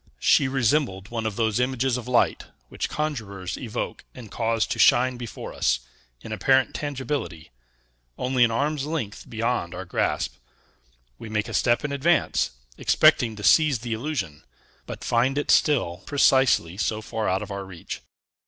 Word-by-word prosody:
She 140 - +4
resembled 125 -6 0
one 115 -2 -2
of 105 - -4
those 110 0 0
images 130 0 0
of 125 -1 -5
light, 125 -1 +2 0.2
which - - -3
conjurers 105 -12 -4
evoke 115 -4 -5
and 115 -5 -11
cause 115 -1 0
to - - -4
shine 125 +1 +5
before 120 -2 -7
us, - - +1 0.4
in - - -9
apparent 130 +5 +2
tangibility, 135 - -4 0.7
only 125 -1 +2
an 120 - +4
arm's 145 +4 -1
length 140 -11 -4
beyond 115 -6 -2
our 95 +1 -6
grasp: 90 - -1 0.8
we 110 - -8
make 105 0 -1
a - - -7
step 120 +4 +2
in 145 - -3
advance, 155 +4 +2 0.3
expecting 115 -3 +4
to 105 - -9
seize 155 0 +5
the 120 -2 -3
illusion, 110 - -4 0.4
but - - -7
find 125 +4 +1
it 145 - +1
still 105 - +2
precisely 130 - +3
so 110 +1 -1
far 110 -2 -2
out 95 +3 0
of 105 - -9
our 100 0 -4
reach. 90 -3 -8
120 Hz, 160 wpm, -25 LUFS, 105-135 Hz, 0.8 s, shine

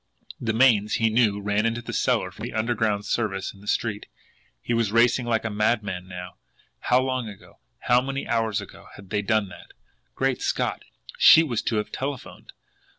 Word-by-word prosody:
The 115 - -1
mains, 110 -3 +3
he 115 -1 +2
knew, 110 -3 +2
ran 105 +1 0
into 115 +1 -3
the - - -6
cellar 115 -8 +1
from 100 - -14
the 120 - -7
underground 110 -2 0
service 100 -4 -2
in 100 - -17
the 105 - -15
street. 105 -1 -1 0.5
He 120 - -3
was 115 -3 +1
racing 120 +2 +3
like 115 -1 0
a 115 - -2
madman 105 -4 -1
now. 90 0 -9 0.4
How 125 - +3
long 130 -3 -2
ago, 100 - -15 0.2
how 125 0 +3
many 135 +1 -4
hours 115 -2 0
ago, - - -13
had 100 -2 -14
they 105 - +1
done 105 -1 0
that! - - -14 0.4
Great - - 0
Scott, - - -1 0.4
SHE 160 - +8
was 120 -8 -2
to 115 - -2
have 105 0 -2
telephoned! 135 -1 -6
110 Hz, 185 wpm, -25 LUFS, 105-120 Hz, 0.5 s, SHE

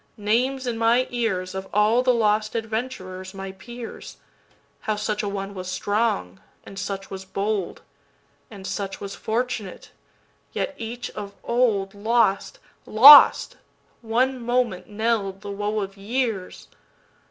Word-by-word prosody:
Names 250 +6 0
in 235 -2 -3
my 235 +3 +3
earsOf 190 -5 -2
all 210 +4 +3
the 255 0 +3
lost 215 -2 +1
adventurers 220 -5 -5
my 195 0 -6
peers,—How 230 0 -9
such 210 0 -2
a 205 - -3
one 200 0 -5
was 185 -1 -6
strong, 185 - -1 0.3
and 195 - -9
such 195 0 -5
was 190 -1 -6
bold, 195 0 -3 0.7
And 200 -3 -11
such 195 -1 -4
was 200 0 -6
fortunate, 225 -4 -4 0.6
yet - - -2
each 240 +2 -6
of 200 -1 -8
oldLost, 220 -2 +1 0.3
lost! 275 +7 +8 0.4
one 250 +3 0
moment 240 -6 0
knell'd 210 -3 -1
the 205 - -7
woe 210 +1 -2
of 195 0 -6
years. 220 -2 -3
210 Hz, 120 wpm, -24 LUFS, 195-235 Hz, 0.7 s, lost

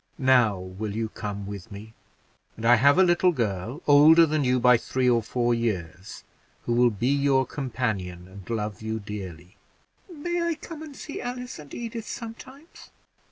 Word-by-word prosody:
Now, 125 -7 +3
will 95 +3 -6
you 110 0 -2
come 100 -2 -6
with 100 +1 -8
me? 105 +2 -10 0.6
and 115 - -6
I 120 - +7
have 140 +5 +5
a 190 - +7
little 180 0 +3
girl, 115 - -3
older 155 +3 +7
than 155 -1 0
you 125 0 +2
by 125 0 +6
three 130 +2 -1
or 120 -2 +3
four 120 +2 0
years, 95 -5 -4 0.4
who 120 - -1
will 120 +1 +4
be 115 +3 -2
your 140 -2 +2
companion, 105 -11 -4
and 95 +1 -13
love 105 -3 -3
you 110 0 -3
dearly." 95 -3 -9 0.5
"May 345 +2 -3
I 335 -1 0
come 315 0 -10
and 305 -3 -9
see 290 - -7
Alice 250 -2 -6
and 145 -2 -12
Edith 230 -1 -6
sometimes?" 260 +7 -10
120 Hz, 170 wpm, -25 LUFS, 105-160 Hz, 0.6 s, I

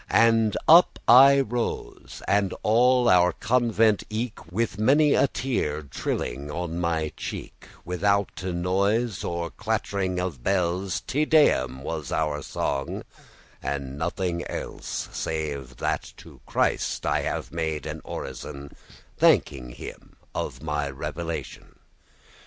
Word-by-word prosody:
<12> 115 +1 +6
And 115 -2 +2
up 170 +2 +7
I 135 +2 +8
rose, 120 -1 -4
and 100 -2 +2
all 125 +3 +4
our 90 -1 +5
convent 115 -3 +2
eke, 110 -7 -5
With 105 0 -1
many 145 +6 +4
a - - +4
teare 115 - -2
trilling 70 0 -4
on 85 +2 -3
my 80 -3 0
cheek, - - -7 0.2
Withoute 95 +2 0
noise 100 +5 0
or 85 0 -3
clattering 100 -4 -2
of 90 -9 -3
bells, 90 +2 0
Te 150 +3 0
Deum 65 - +3
was 75 -2 -4
our 75 -2 0
song, 70 0 -3 0.6
and 70 -1 -4
nothing 85 +1 -2
else, - - -5
Save 70 -5 -4
that - - -2
to - - -14
Christ - - 0
I - - 0
bade 80 -2 -2
an - - -5
orison, 70 +2 -7 0.4
Thanking 60 -3 +3
him - - -10 0.2
of - - -4
my 75 -1 -1
revelation. 80 +4 -6
90 Hz, 120 wpm, -25 LUFS, 75-115 Hz, 0.6 s, I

